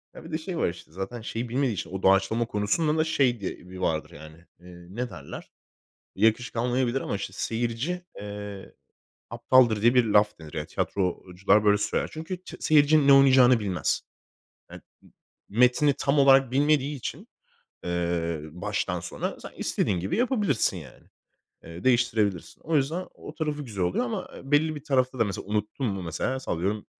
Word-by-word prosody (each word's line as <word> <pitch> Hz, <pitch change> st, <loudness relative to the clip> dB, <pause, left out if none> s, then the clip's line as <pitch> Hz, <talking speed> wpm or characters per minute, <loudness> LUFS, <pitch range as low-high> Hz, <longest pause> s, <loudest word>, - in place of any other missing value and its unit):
Ha, -, -, -10 dB
bir 165 Hz, -, -11 dB
de 155 Hz, -, 0 dB
şey 170 Hz, +2 st, -6 dB
var -, -, +1 dB
işte. 85 Hz, -2 st, -11 dB
Zaten 95 Hz, +7 st, -6 dB
şeyi 115 Hz, +2 st, -4 dB
bilmediği 130 Hz, 0 st, 0 dB
için, 95 Hz, -, -5 dB
o 95 Hz, 0 st, -5 dB
doğaçlama 95 Hz, +5 st, +3 dB
konusunda 115 Hz, +10 st, 0 dB
da 155 Hz, -, +3 dB
şey 135 Hz, -7 st, +1 dB
diye 95 Hz, -, -4 dB
bir 95 Hz, -, -9 dB
vardır 80 Hz, -3 st, -1 dB
yani, 80 Hz, +2 st, -13 dB
iii, 90 Hz, +1 st, -14 dB
ne 125 Hz, +1 st, -3 dB
derler? 75 Hz, -8 st, -10 dB, 0.6 s
Yakışık 110 Hz, +5 st, +1 dB
almayabilir 125 Hz, +2 st, 0 dB
ama -, -, -3 dB
işte 100 Hz, -1 st, -6 dB
seyirci, 120 Hz, -, -2 dB, 0.2 s
eee, 105 Hz, -1 st, -8 dB, 0.6 s
aptaldır 120 Hz, -2 st, +3 dB
diye 120 Hz, +2 st, +5 dB
bir 125 Hz, -2 st, +5 dB
laf 105 Hz, -2 st, +2 dB
denir. 75 Hz, -1 st, -6 dB
Tiyatrocular 95 Hz, +3 st, 0 dB
böyle 105 Hz, 0 st, +5 dB
söyler. 105 Hz, -, -1 dB
Çünkü 160 Hz, +4 st, -5 dB
t -, -, -10 dB
seyirci 150 Hz, -1 st, +4 dB
ne 140 Hz, -, +8 dB
oynayacağını 130 Hz, -3 st, +6 dB
bilmez. 95 Hz, -4 st, -1 dB, 0.7 s
I -, -, -9 dB
ı -, -, -10 dB, 0.7 s
metni 125 Hz, +6 st, +4 dB
tam 140 Hz, +1 st, +1 dB
olarak 135 Hz, -2 st, +5 dB
bilmediği 145 Hz, +1 st, +2 dB
için, 130 Hz, -, -7 dB, 0.6 s
eee, 85 Hz, -2 st, -1 dB
baştan 85 Hz, +3 st, -3 dB
sona -, -, -5 dB
sen -, -, -10 dB
istediğin 90 Hz, -4 st, -1 dB
gibi 95 Hz, -, -2 dB
yapabilirsin 220 Hz, -, +1 dB
yani. 75 Hz, -7 st, -12 dB, 0.6 s
Eee, 85 Hz, +2 st, -10 dB
değiştirebilirsin. 115 Hz, -7 st, +1 dB
O 160 Hz, 0 st, 0 dB
yüzden 155 Hz, +6 st, -1 dB
o -, -, -11 dB
tarafı 150 Hz, -2 st, -3 dB
güzel 100 Hz, -7 st, -3 dB
oluyor 90 Hz, +7 st, 0 dB
ama, 120 Hz, -, -4 dB
eee, -, -, -9 dB
belli 155 Hz, +2 st, +3 dB
bir 150 Hz, -1 st, -9 dB
tarafta 130 Hz, -3 st, +1 dB
da 115 Hz, -, +3 dB
mesela 100 Hz, -3 st, -5 dB
unuttun 105 Hz, +5 st, -2 dB
mu? 100 Hz, -4 st, -3 dB
Mesela 90 Hz, +11 st, -3 dB
sallıyorum, 100 Hz, 0 st, -2 dB
115 Hz, 170 wpm, -26 LUFS, 95-135 Hz, 0.7 s, ne